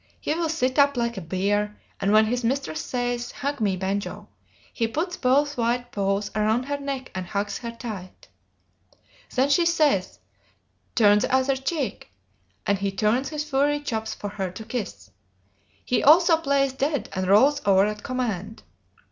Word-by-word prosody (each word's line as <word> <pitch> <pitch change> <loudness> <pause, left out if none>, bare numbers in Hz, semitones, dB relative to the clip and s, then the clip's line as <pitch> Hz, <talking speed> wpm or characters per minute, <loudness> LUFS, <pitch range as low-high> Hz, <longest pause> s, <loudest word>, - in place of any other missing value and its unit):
He - - -1
will 330 0 -1
sit 260 -4 0
up 280 -1 +4
like 235 0 0
a 195 - -5
bear, 205 +4 -1 0.2
and 195 - +1
when 215 +1 +6
his 245 +2 -1
mistress 275 +5 -1
says, 245 -1 -2
"Hug 280 -2 -4
me, 195 -3 +1
Banjo," 195 +2 -3 0.4
he 230 - 0
puts 340 +9 -2
both 280 +2 +1
white 240 +1 0
paws 200 0 -1
around 215 +3 +1
her 285 +2 -3
neck 275 -2 -5
and 185 - -3
hugs 200 +1 -2
her 235 - -5
tight. 220 -6 -8 1.1
Then 265 +2 +3
she 315 +5 +4
says, 300 - +2 0.8
"Turn 205 -2 +5
the - - -1
other 260 +1 +3
cheek," 270 - -3 0.6
and 200 -1 +1
he 200 0 -1
turns 215 +7 +1
his 300 -1 -4
furry 290 +1 +2
chops 220 -6 -3
for 205 - -5
her 195 -2 -3
to 200 +5 -9
kiss. 215 - -5 0.7
He 250 - +1
also 330 +3 +6
plays 275 -3 +1
"dead," 280 +1 -1
and 185 -1 -2
rolls 270 +9 +5
over 195 -1 +4
at 210 0 -3
command. 220 -5 -4
240 Hz, 165 wpm, -25 LUFS, 205-280 Hz, 1.1 s, when